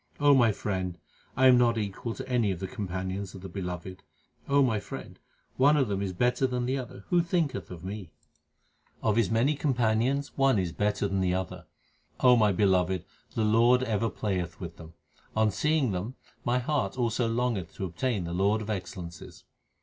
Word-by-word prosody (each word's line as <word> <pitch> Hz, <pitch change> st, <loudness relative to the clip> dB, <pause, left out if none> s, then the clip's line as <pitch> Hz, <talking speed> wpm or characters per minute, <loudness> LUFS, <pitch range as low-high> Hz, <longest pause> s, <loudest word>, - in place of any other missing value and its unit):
O 145 Hz, 0 st, +6 dB
my 120 Hz, -4 st, +5 dB
friend, 95 Hz, -4 st, -3 dB, 0.4 s
I 130 Hz, -, +4 dB
am 125 Hz, -1 st, +7 dB
not 120 Hz, -1 st, +3 dB
equal 110 Hz, +2 st, -3 dB
to -, -, -7 dB
any 120 Hz, -5 st, +1 dB
of 95 Hz, -3 st, -2 dB
the 95 Hz, -, -3 dB
companions 95 Hz, 0 st, -4 dB
of 95 Hz, -, -9 dB
the 95 Hz, -, -7 dB
Beloved. 90 Hz, +1 st, -6 dB, 0.5 s
my 135 Hz, -6 st, +3 dB
friend, -, -, -9 dB, 0.4 s
one 145 Hz, +3 st, +5 dB
of 135 Hz, -6 st, +2 dB
them 100 Hz, -1 st, -1 dB
is 100 Hz, -2 st, -2 dB
better 125 Hz, +7 st, +1 dB
than 125 Hz, -1 st, -2 dB
the 130 Hz, +2 st, 0 dB
other; 130 Hz, -1 st, -7 dB
who 175 Hz, -1 st, +4 dB
thinketh 165 Hz, -, -1 dB
of 90 Hz, -2 st, -9 dB
me? 95 Hz, -2 st, -6 dB, 0.9 s
Of 110 Hz, -2 st, +2 dB
His 115 Hz, -, +2 dB
many 115 Hz, +6 st, +2 dB
companions 130 Hz, 0 st, 0 dB
one 135 Hz, -4 st, +3 dB
is 90 Hz, -3 st, 0 dB
better 105 Hz, +2 st, 0 dB
than 95 Hz, -1 st, -1 dB
the 90 Hz, -1 st, +1 dB
other, 90 Hz, -3 st, -5 dB, 0.5 s
O 125 Hz, -1 st, +6 dB
my 105 Hz, -3 st, +4 dB
beloved; 95 Hz, -2 st, +2 dB, 0.3 s
the 110 Hz, -2 st, +1 dB
Lord 120 Hz, +4 st, +4 dB
ever 115 Hz, -1 st, 0 dB
playeth 90 Hz, -6 st, -3 dB
with 85 Hz, -3 st, -7 dB
them. 80 Hz, 0 st, -12 dB, 0.4 s
On 110 Hz, -1 st, +3 dB
seeing 150 Hz, -4 st, +1 dB
them 100 Hz, +7 st, -4 dB, 0.3 s
my 120 Hz, +1 st, +1 dB
heart 130 Hz, -5 st, -1 dB
also 120 Hz, -1 st, +1 dB
longeth 115 Hz, -9 st, -1 dB
to 95 Hz, -, -3 dB
obtain 95 Hz, +4 st, -1 dB
the 85 Hz, 0 st, -4 dB
Lord 100 Hz, +4 st, +2 dB
of 110 Hz, -, -4 dB
excellences. 85 Hz, -4 st, -7 dB
110 Hz, 185 wpm, -28 LUFS, 95-125 Hz, 0.9 s, am